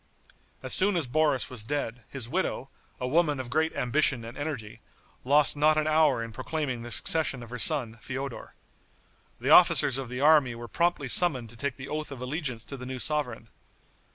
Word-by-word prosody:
As - - 0
soon 195 +1 +3
as 165 - +1
Boris 145 0 +1
was 125 -4 -4
dead, 125 -2 -4
his 130 -4 -5
widow, 135 -3 -2 0.3
a 125 - -3
woman 150 0 +1
of 125 -2 -6
great 160 +3 +1
ambition 125 -2 +1
and 115 +2 -9
energy, 145 -8 -6 0.4
lost 145 +3 +3
not 155 +1 +3
an 155 - +1
hour 155 -6 +3
in 115 - -7
proclaiming 130 0 -4
the 120 - -8
succession 135 -1 +2
of 115 - -12
her 125 - -5
son, 120 -6 +2
Feodor. 135 -1 -6 0.8
The - - -1
officers 130 - +6
of 130 -3 -6
the 125 0 -5
army 145 -4 +4
were 120 0 -8
promptly 170 -1 0
summoned 130 -6 0
to - - -15
take 130 +2 -3
the 130 0 -9
oath 155 -1 -4
of 135 - -8
allegiance 125 -3 -4
to 140 - -7
the 125 - -8
new 130 0 -5
sovereign. 125 -5 -3
135 Hz, 190 wpm, -27 LUFS, 120-155 Hz, 0.8 s, officers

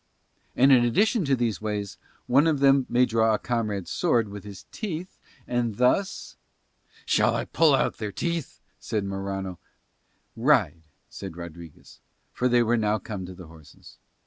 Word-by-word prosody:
And 135 +2 +5
in 125 -3 +6
addition 205 - +2
to 135 -1 +2
these 120 -4 -2
ways, 105 -2 -4 0.3
one 140 +6 +4
of 155 -2 +2
them 135 -1 +4
may 125 +1 +4
draw 115 -2 +2
a - - -1
comrade's 105 -6 -3
sword 120 - +1
with 100 0 -8
his 100 -3 -11
teeth 185 -4 -6 0.3
and 120 -3 -1
thus 190 +11 0 0.3
..." - - -31
"Shall - - +2
I - - -2
pull 160 -4 +3
out - - 0
their 105 -2 -4
teeth?" 170 - -4 0.2
said 105 -3 -3
Morano. 95 -2 -4 0.8
"Ride," 115 - +2 0.3
said 95 -4 -9
Rodriguez, 85 -2 -11 0.3
for 125 - 0
they 120 -1 +4
were 120 +1 +1
now 105 -1 +1
come 100 -5 -7
to 90 - -9
the 90 - -11
horses. 80 -2 -16
115 Hz, 165 wpm, -26 LUFS, 100-135 Hz, 0.8 s, in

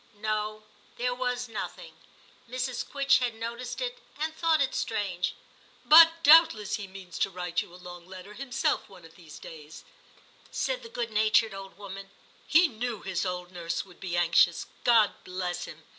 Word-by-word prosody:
No, 215 0 -2 0.3
there 245 +1 0
was 250 0 -2
nothing; 225 -2 -7 0.6
Mrs. 250 0 -2
Quitchett 275 -2 +2
had 240 -2 -1
noticed 235 +2 -5
it - - -3 0.2
and 315 +1 -2
thought 325 -1 +2
it 270 -2 +1
strange. 190 -5 -2 0.2
* - - -29
But 330 0 +8
doubtless 295 - +6
he 205 -2 -7
means 190 -2 -10
to - - +2
write 180 -1 -2
you - - -11
a - - -13
long 175 -1 -11
letter 190 +2 -10
himself 255 +2 -1
one 180 -4 -14
of 165 - -15
these 165 -5 -13
days,' 155 -1 -11 0.7
said - - -2
the 460 - -11
good 235 - -4
natured 215 0 +3
old 195 0 -9
woman; 195 -1 -9 0.2
* - - -30
he 345 +1 +6
knew 240 -3 -5
his 190 0 -2
old 180 0 -5
nurse 170 -1 -3
would 180 -2 -18
be 175 -2 -3
anxious, 170 0 +3 0.2
God 230 -4 +5
bless 180 -1 -4
him - - -12
210 Hz, 175 wpm, -28 LUFS, 180-250 Hz, 0.7 s, But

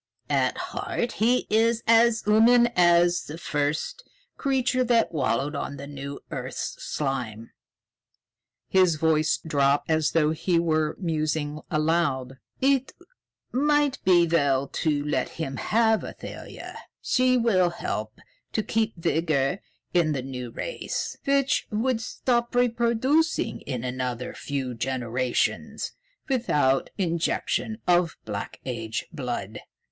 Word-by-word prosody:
At - - +2
heart 240 - -3
he 240 +4 +2
is 230 +1 +3
as 230 0 +4
human 230 +3 +5
as 175 0 +4
the 155 - -7
first 150 - -2
man - - -34 0.2
creature 260 -2 +1
that 235 -2 +2
wallowed 140 -1 0
in 140 0 -4
the - - -7
new 140 0 -7
earth's - - -5
slime." 120 -6 -3 1.2
His 185 -3 +4
voice 155 0 +2
dropped 145 -1 +1
as 155 -1 +2
though 155 -2 +3
he 170 +2 0
were 155 -2 +1
musing 155 -3 -1
aloud. 155 -5 0 0.2
"It 270 -1 +2 0.6
might 290 +1 +2
be 175 -2 +5
well 140 -5 +2
to 150 -2 -1
let 150 - 0
him 135 -5 -5
have 220 - +2
Athalia. - - -8 0.2
She 255 0 +2
will 195 -7 +3
help 170 - -4 0.4
to 215 - 0
keep 225 0 0
vigor 160 -1 0 0.3
in 165 -4 +3
the 130 -3 -3
new 125 -2 -6
race, - - -4
which 275 -1 +2
would 225 +2 0
stop 240 0 -1
reproducing 245 +6 +1
in 125 -4 -3
another 125 -1 -3
few 135 -3 -4
generations 125 0 -1 0.4
without 150 - +1
the 200 - +1
injection 170 +5 -1
of 175 -2 +3
Black 100 -2 -5
Age 115 -4 -3
blood." 120 -8 -4
165 Hz, 120 wpm, -26 LUFS, 140-230 Hz, 1.2 s, human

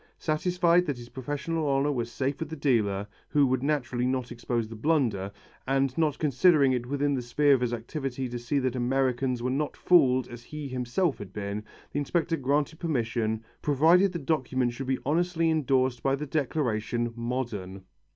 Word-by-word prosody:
Satisfied 175 +2 +2
that 140 -4 -1
his 120 0 -10
professional 145 +4 -3
honour 140 +1 +2
was 120 -4 -2
safe 135 +3 -2
with 160 - -4
the 160 - -5
dealer, 110 -9 +1 0.2
who 145 -1 +4
would 130 -1 +1
naturally 130 -4 0
not 130 -1 -2
expose 120 -1 -2
the 115 - -9
blunder, 115 -7 0 0.4
and 135 -1 +1
not 155 -3 +1
considering 145 0 +4
it 125 -1 -1
within 145 +1 0
the 130 - -1
sphere 140 +4 +3
of 130 - +2
his 125 -1 0
activity 130 +2 -4
to 120 0 -5
see 120 +5 -1
that 130 -2 0
Americans 125 0 0
were 125 - 0
not 145 +2 -2
fooled 130 -8 +4
as 120 0 -9
he 150 -1 -6
himself 130 +6 -1
had 100 -3 -8
been, 100 +1 -4 0.3
the 145 - -1
inspector 165 +3 0
granted 145 +2 0
permission, 115 -7 -1 0.2
provided 165 +7 +4
the 175 - -3
documents 130 -5 0
should 135 +2 -6
be 130 0 +1
honestly 165 +2 +1
endorsed 130 -5 +1
by 135 0 +2
the 150 +2 -5
declaration 120 -6 -1
"modern." 115 -6 -4
130 Hz, 180 wpm, -28 LUFS, 120-150 Hz, 0.4 s, who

